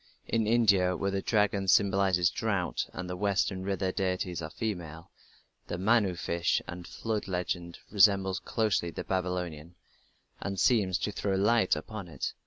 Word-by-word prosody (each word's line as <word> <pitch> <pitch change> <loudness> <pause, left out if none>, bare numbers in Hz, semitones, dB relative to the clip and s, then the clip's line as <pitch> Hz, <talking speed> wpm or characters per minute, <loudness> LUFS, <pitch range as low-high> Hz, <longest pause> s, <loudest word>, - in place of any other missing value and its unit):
In 110 -2 +1
India, 100 -6 +3
where 100 +2 -1
the 100 0 -1
dragon 100 -3 +1
symbolizes 95 -2 +3
drought - - -1
and 90 - -6
the 90 - -4
western 100 -1 0
river 95 -1 -1
deities 90 -2 -2
are 80 - -5
female, 85 -5 -5 0.6
the 85 - -3
Manu 100 -1 +2
fish 85 0 0
and 90 0 -7
flood 110 -2 -3
legend 90 -2 -3
resembles 95 -2 +4
closely 105 -6 0
the - - -6
Babylonian, 90 -3 -3 0.6
and 100 -1 -4
seems 95 -2 +3
to 105 - -2
throw 100 -1 -1
light 105 +1 +3
upon 95 +5 -7
it. 80 - -4
95 Hz, 150 wpm, -29 LUFS, 90-100 Hz, 0.6 s, resembles